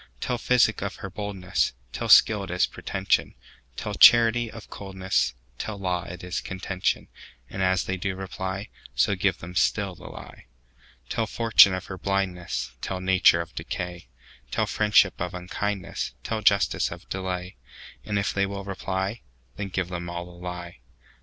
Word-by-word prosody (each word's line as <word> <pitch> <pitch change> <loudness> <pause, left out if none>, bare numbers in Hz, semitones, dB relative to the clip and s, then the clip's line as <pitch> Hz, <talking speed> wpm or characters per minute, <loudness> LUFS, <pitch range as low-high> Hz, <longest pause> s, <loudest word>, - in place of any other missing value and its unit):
Tell 125 - -2
physic 125 0 +3
of - - -3
her 95 - -7
boldness; 100 -2 -1 0.2
Tell - - -3
skill 105 -2 +7
it 95 - -7
is 90 0 +2
pretension; 95 0 -1 0.4
Tell - - -4
charity 120 0 +7
of 110 -1 -10
coldness; 95 -8 -1 0.2
Tell 110 -2 -4
law 90 -3 -1
it 90 0 -8
is 90 +1 -3
contention:And 95 -6 -4
as 95 0 +2
they 95 - -2
do 95 +1 -2
reply, 95 +1 -5 0.3
So 60 - +3
give - - +1
them 90 +2 -9
still 100 +1 +1
the - - -14
lie. - - -11 0.6
Tell 115 - -1
fortune 110 -4 +6
of 95 - -5
her 95 -1 -7
blindness; 90 -8 -2
Tell 95 - -3
nature 95 -2 +4
of 85 - -9
decay; 90 -3 -5 0.4
Tell - - +1
friendship 105 -4 +3
of 90 +1 -3
unkindness; 95 +2 -3
Tell 110 -1 -2
justice 100 -1 +3
of - - -10
delay; 90 -1 -4 0.5
And 105 - -2
if 100 -1 0
they 100 0 +1
will 100 0 -5
reply, 95 +2 -3 0.3
Then 100 - -4
give 95 -2 -2
them 85 -1 -5
all 85 0 -4
the 90 - -12
lie. 90 -2 -7
95 Hz, 160 wpm, -26 LUFS, 90-100 Hz, 0.6 s, skill